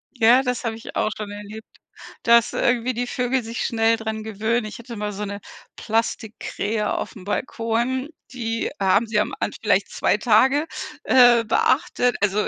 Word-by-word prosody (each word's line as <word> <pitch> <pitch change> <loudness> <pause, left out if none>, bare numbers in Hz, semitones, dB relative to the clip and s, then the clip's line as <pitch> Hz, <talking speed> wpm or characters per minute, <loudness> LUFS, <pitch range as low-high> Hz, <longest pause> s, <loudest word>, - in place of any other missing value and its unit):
Ja, 240 +2 +5
das 250 -1 -2
habe 225 -2 -2
ich 225 - -10
auch 215 - 0
schon 210 -1 -6
erlebt, 210 +2 -9 0.6
dass 235 0 +4
irgendwie 245 +1 +1
die 245 +1 -3
Vögel 250 +1 -1
sich 230 +2 -4
schnell 225 -1 +2
dran 220 -1 -4
gewöhnen. 220 +2 -1
Ich 215 - -8
hatte 235 0 -9
mal 210 -1 -3
so 205 +1 -5
'ne 200 0 -6 0.4
Plastikkrähe 220 -1 -2
aufm 200 - -5
Balkon, 235 +5 -2 0.2
die 230 -2 -2
haben 200 +3 +3
sie 215 -1 +1
am 210 - -1
An - - -1
vielleicht - - +2
2 - - +1
Tage, 265 +6 +3 0.4
äh, 245 -2 +6
beachtet, 245 +2 +1
also 205 +1 +1
225 Hz, 165 wpm, -22 LUFS, 215-245 Hz, 0.6 s, äh